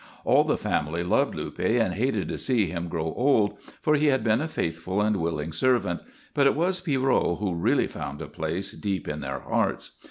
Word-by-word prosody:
All -, -, +5 dB
the -, -, +1 dB
family 80 Hz, +3 st, -1 dB
loved 90 Hz, -, +1 dB
Luppe 120 Hz, +2 st, -1 dB
and 110 Hz, -5 st, +1 dB
hated 125 Hz, +8 st, 0 dB
to -, -, -3 dB
see 120 Hz, -6 st, +2 dB
him 85 Hz, 0 st, -4 dB
grow 80 Hz, -1 st, -2 dB
old, 110 Hz, -6 st, +2 dB, 0.2 s
for 150 Hz, -, +3 dB
he 150 Hz, 0 st, +3 dB
had 130 Hz, -4 st, +3 dB
been 110 Hz, +2 st, +2 dB
a 160 Hz, -, -1 dB
faithful 85 Hz, -, -2 dB
and 105 Hz, 0 st, +2 dB
willing 80 Hz, -2 st, -2 dB
servant, 115 Hz, -10 st, +2 dB, 0.3 s
but 140 Hz, -1 st, +4 dB
it -, -, +3 dB
was 180 Hz, +3 st, +1 dB
Pierrot 135 Hz, -, +1 dB
who 100 Hz, -4 st, -1 dB
really 85 Hz, -, +2 dB
found 70 Hz, +1 st, -6 dB
a -, -, -6 dB
place 85 Hz, +5 st, -3 dB
deep 100 Hz, -3 st, -3 dB
in 75 Hz, 0 st, -3 dB
their 70 Hz, 0 st, -4 dB
hearts. -, -, -1 dB
100 Hz, 200 wpm, -26 LUFS, 85-130 Hz, 0.3 s, All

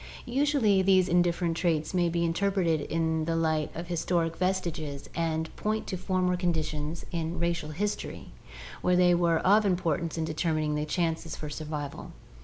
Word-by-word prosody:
Usually 250 Hz, -6 st, +3 dB
these 190 Hz, -1 st, +4 dB
indifferent 175 Hz, -1 st, +2 dB
traits 165 Hz, -2 st, 0 dB
may 175 Hz, -2 st, +2 dB
be 170 Hz, 0 st, 0 dB
interpreted 170 Hz, -2 st, +1 dB
in 160 Hz, +1 st, 0 dB
the 165 Hz, 0 st, 0 dB
light 160 Hz, -2 st, +1 dB
of 170 Hz, -, -4 dB
historic 170 Hz, -1 st, 0 dB
vestiges 170 Hz, -6 st, -2 dB
and 160 Hz, -1 st, -2 dB
point 215 Hz, +1 st, -1 dB
to -, -, -3 dB
former 185 Hz, 0 st, 0 dB
conditions 160 Hz, -3 st, -2 dB
in 165 Hz, 0 st, -2 dB
racial 170 Hz, -2 st, -1 dB
history 205 Hz, +7 st, -4 dB, 0.5 s
where 180 Hz, -, +3 dB
they 180 Hz, 0 st, +5 dB
were 170 Hz, -1 st, +3 dB
of 205 Hz, +3 st, +5 dB
importance 170 Hz, -4 st, 0 dB
in 160 Hz, -, 0 dB
determining 155 Hz, -1 st, 0 dB
the 150 Hz, 0 st, -1 dB
chances 165 Hz, 0 st, -1 dB
for 150 Hz, -1 st, -6 dB
survival. 150 Hz, -2 st, -5 dB
170 Hz, 155 wpm, -28 LUFS, 160-180 Hz, 0.5 s, they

